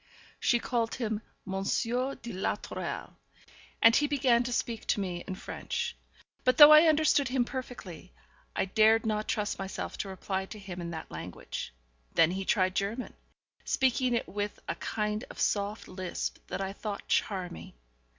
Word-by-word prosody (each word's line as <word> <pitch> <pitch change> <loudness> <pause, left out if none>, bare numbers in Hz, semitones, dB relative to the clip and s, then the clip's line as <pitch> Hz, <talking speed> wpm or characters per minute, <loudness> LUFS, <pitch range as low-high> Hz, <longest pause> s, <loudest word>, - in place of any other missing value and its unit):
She 240 - +3
called 235 -1 -1
him 220 -4 -2 0.2
Monsieur 235 +7 -1
de 235 -2 -8
la 190 +2 0
Tourelle, - - -6 0.7
and 230 +1 +8
he 295 - +4
began 260 -4 +3
to 245 0 -3
speak 230 -1 -2
to - - +2
me 180 -3 -3
in 190 - -3
French; - - -4 0.5
but 255 - +3
though 295 0 +11
I 305 +2 +9
understood 310 -2 +4
him 250 0 +1
perfectly, 220 - -7 0.4
I - - +1
dared 220 +3 +4
not 215 -1 -1
trust 210 -2 -1
myself 195 0 -5
to 195 - -3
reply 190 0 -3
to 215 - -9
him 190 -3 -7
in 170 - -4
that 160 -1 -7
language. 80 +3 -6 0.4
Then 165 +1 +5
he 190 +1 -3
tried 185 -3 +2
German, 210 +6 -2 0.5
speaking 255 -1 +2
it 235 - -1
with 205 +1 -3
a - - 0
kind 210 0 -2
of - - -10
soft 205 +1 0
lisp 185 -1 -4
that - - -3
I 195 0 -3
thought 205 -1 -5
charming. 180 - -1
210 Hz, 165 wpm, -30 LUFS, 190-245 Hz, 0.7 s, though